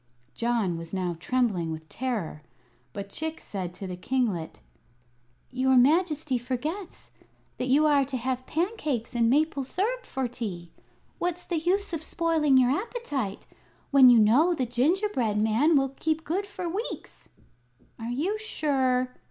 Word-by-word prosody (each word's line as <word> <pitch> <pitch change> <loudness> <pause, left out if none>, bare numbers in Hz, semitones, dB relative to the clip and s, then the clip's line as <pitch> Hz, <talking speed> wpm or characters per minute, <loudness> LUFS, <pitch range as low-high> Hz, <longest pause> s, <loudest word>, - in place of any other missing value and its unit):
John 230 -8 0
was 165 +3 -7
now 180 -2 -1
trembling 210 -7 0
with 160 0 -7
terror; 220 -12 -3 0.5
but 200 +7 -7
Chick 315 +5 -3
said 185 -4 -5
to 195 - -7
the 180 -1 -5
kinglet: 195 - -2 0.9
"Your 260 +1 +2
Majesty 300 0 +3
forgets 300 - -5 0.5
that 255 - -1
you 285 +4 +4
are 290 -2 +4
to 265 -1 -3
have 255 +1 -3
pancakes 310 - -2
and 230 -1 +2
maple 290 +1 +2
syrup 450 - -2
for 265 -1 -2
tea. 190 -8 -6 0.5
What's 355 0 -2
the 340 -3 -2
use 370 +4 0
of 325 - -2
spoiling 315 -4 +2
your 255 -1 +4
appetite, 290 - -3 0.5
when 270 -3 +8
you 240 - +7
know 260 +12 +5
the 260 - -1
gingerbread 250 - +1
man 230 +9 +3
will 270 -1 +2
keep 315 +4 -2
good 375 +7 -2
for 365 -3 -5
weeks?" 395 +8 -6 0.7
"Are 225 +1 -5
you 340 - -1
sure?" 265 - 0
260 Hz, 145 wpm, -27 LUFS, 230-320 Hz, 0.9 s, when